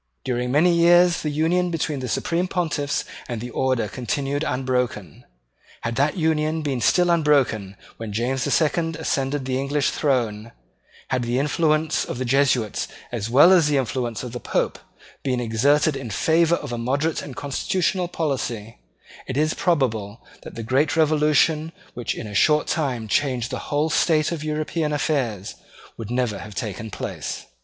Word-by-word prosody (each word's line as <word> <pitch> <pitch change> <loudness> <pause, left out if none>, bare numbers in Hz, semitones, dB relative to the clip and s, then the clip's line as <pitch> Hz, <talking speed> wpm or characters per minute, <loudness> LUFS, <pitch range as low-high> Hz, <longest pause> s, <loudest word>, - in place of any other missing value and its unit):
During 125 -1 -1
many 165 +6 +4
years 175 0 +5
the 155 - -2
union 165 +4 +1
between 155 -4 -2
the 130 - -4
Supreme 170 +9 0
Pontiffs 160 -6 -1 0.2
and 120 -2 -3
the 120 +2 -6
Order 130 -1 +1
had 105 - -5
continued 140 +3 -2
unbroken. 125 - -2 0.6
Had 115 0 -3
that 145 +5 +1
union 160 -1 0
been 135 -4 -2
still 175 +5 +3
unbroken 140 - +2 0.2
when 115 -2 -6
James 125 +5 -1
the - - -1
Second 165 +1 +1
ascended 140 -3 -1
the 130 0 -1
English 140 +1 0
throne, 115 -6 -1 0.6
had 130 -1 0
the 120 +1 -1
influence 155 +2 +1
of - - -5
the 130 - -2
Jesuits 125 -4 +1 0.2
as 115 -2 -3
well 145 +9 +7
as 170 -5 +5
the 145 -1 +2
influence 120 -2 -2
of 125 - -6
the 120 - -5
Pope - - -1 0.4
been 130 -2 -1
exerted 135 +6 +2
in 135 -4 -5
favour 165 +9 +3
of 145 -7 -6
a 120 - -3
moderate 140 +7 0
and 135 - -8
constitutional 180 +6 -1
policy, 125 -10 -3 0.5
it 130 - -3
is 155 +1 +2
probable 115 - -1 0.2
that - - -10
the 115 - -5
great 135 +7 +1
revolution 155 0 +3 0.2
which 120 -2 -3
in - - -6
a 105 - -8
short 150 +9 +3
time 130 -8 -1
changed 125 -1 0
the - - -3
whole 150 +2 +1
state 155 0 +2
of 160 -3 -4
European 155 0 -2
affairs 135 - -1 0.4
would 115 -2 -7
never 120 -5 -1
have 105 -2 -9
taken 110 +1 -4
place. - - -5
140 Hz, 165 wpm, -23 LUFS, 120-155 Hz, 0.6 s, well